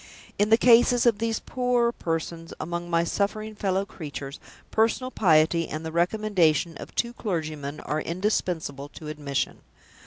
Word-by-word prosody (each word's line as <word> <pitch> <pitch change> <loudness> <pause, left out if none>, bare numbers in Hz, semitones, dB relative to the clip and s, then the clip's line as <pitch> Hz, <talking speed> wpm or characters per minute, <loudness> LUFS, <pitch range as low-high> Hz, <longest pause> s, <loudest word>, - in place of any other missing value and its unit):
In 205 +1 +3
the 225 - +7
cases 240 0 +5
of 230 -4 +4
these 225 -1 0
poorer 245 -1 +1
persons 165 -3 -4
among 175 +1 -4
my 170 0 +2
suffering 215 +4 -2
fellow 195 -1 0
creatures, 145 -6 -7 0.3
personal 230 +4 +1
piety 165 -3 +3
and 155 +1 -5
the 160 - -4
recommendation 170 -3 +2
of - - -10
two 235 0 0
clergymen 155 -9 -4
are 155 +1 -2
indispensable 170 -6 -2
to 155 0 -9
admission. 145 -3 -2
175 Hz, 145 wpm, -26 LUFS, 155-220 Hz, 0.3 s, the